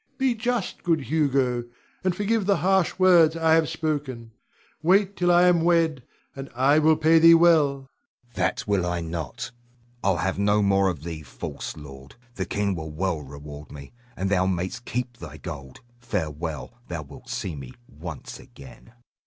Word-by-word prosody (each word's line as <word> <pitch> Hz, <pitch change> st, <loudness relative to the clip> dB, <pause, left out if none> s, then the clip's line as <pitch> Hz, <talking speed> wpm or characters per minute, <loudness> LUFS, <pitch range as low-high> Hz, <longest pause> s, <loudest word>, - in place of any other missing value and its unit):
Be 265 Hz, -2 st, +2 dB
just, 235 Hz, -2 st, -2 dB
good 165 Hz, -3 st, +1 dB
Hugo, 135 Hz, -4 st, +1 dB, 0.4 s
and 185 Hz, -2 st, +1 dB
forgive 205 Hz, +1 st, 0 dB
the 200 Hz, -, +3 dB
harsh 190 Hz, -2 st, +2 dB
words 175 Hz, -4 st, +5 dB
I 160 Hz, -1 st, +3 dB
have 160 Hz, -1 st, +3 dB
spoken. 135 Hz, -7 st, -3 dB, 0.5 s
Wait 195 Hz, +4 st, +3 dB
till 175 Hz, -1 st, +2 dB
I 175 Hz, 0 st, +6 dB
am 180 Hz, -2 st, +4 dB
wed, 165 Hz, -4 st, +2 dB, 0.3 s
and 135 Hz, -1 st, -7 dB
I 140 Hz, +4 st, +4 dB
will 155 Hz, +1 st, +4 dB
pay 160 Hz, +1 st, +4 dB
thee 165 Hz, +1 st, +8 dB
well. 165 Hz, -4 st, +5 dB
Hugo. 135 Hz, -1 st, -11 dB, 0.5 s
That 125 Hz, 0 st, -1 dB
will 100 Hz, -3 st, +1 dB
I 90 Hz, -1 st, -2 dB
not. 80 Hz, -, -5 dB, 0.5 s
I'll 95 Hz, -2 st, +2 dB
have 95 Hz, +3 st, -1 dB
no 105 Hz, +1 st, +3 dB
more 100 Hz, -1 st, +3 dB
of 80 Hz, -5 st, -5 dB
thee, 80 Hz, -2 st, -6 dB
false 70 Hz, -, -7 dB
lord! 70 Hz, -2 st, -12 dB, 0.2 s
The 95 Hz, -5 st, -3 dB
king 100 Hz, -1 st, -1 dB
will 80 Hz, -3 st, -5 dB
well 85 Hz, +2 st, -2 dB
reward 75 Hz, +1 st, -10 dB
me, 70 Hz, +4 st, -11 dB, 0.2 s
and 95 Hz, +1 st, -2 dB
thou 95 Hz, -1 st, +2 dB
mayst 95 Hz, +6 st, -3 dB
keep 125 Hz, 0 st, -4 dB
thy 80 Hz, -2 st, -9 dB
gold. 70 Hz, -7 st, -9 dB, 0.2 s
Farewell! 80 Hz, -8 st, -4 dB
Thou 85 Hz, -3 st, -5 dB
wilt 70 Hz, -, -14 dB
see 90 Hz, -5 st, -4 dB
me 65 Hz, -3 st, -9 dB, 0.2 s
once -, -, -9 dB
again. 70 Hz, -, -15 dB
120 Hz, 170 wpm, -25 LUFS, -, 0.5 s, thee